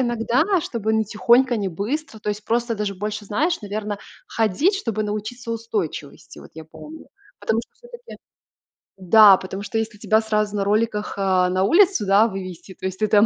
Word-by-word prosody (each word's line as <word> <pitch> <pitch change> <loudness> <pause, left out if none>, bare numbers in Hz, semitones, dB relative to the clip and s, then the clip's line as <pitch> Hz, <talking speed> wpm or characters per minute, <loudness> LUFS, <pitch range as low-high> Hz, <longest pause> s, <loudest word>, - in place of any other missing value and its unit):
иногда, 240 +1 +1 0.2
чтобы 220 -7 -3
не 220 0 +2
тихонько, 240 +4 +3
не 200 -2 -2
быстро, 220 - -4
то 210 - -6
есть 210 0 -3
просто 235 +1 0
даже 205 -2 -3
больше, 210 +2 -5
знаешь, 305 - -1
наверно, 205 0 -4 0.3
ходить, 225 - +1
чтобы 225 - -3
научиться 215 +3 -5
устойчивости, 215 -10 -5
вот - - -14
я 160 0 -9
помню. 305 - -12 0.3
Потому 220 +1 0
что - - -18
всё-таки 485 0 -13 0.8
да, 195 +1 +7
потому 190 +1 -7
что 205 +2 -4
если 220 -1 -3
тебя 220 +1 +2
сразу 215 -1 -1
на 200 - 0
роликах, 210 +1 0
а, 185 -2 +2
на 185 +1 0
улицу, 355 - +4
да, 200 +3 +5
вывести, 190 -2 -8
то - - -10
есть 190 - -6
ты - - +3
там, 205 +1 +5
215 Hz, 180 wpm, -22 LUFS, 200-230 Hz, 0.8 s, да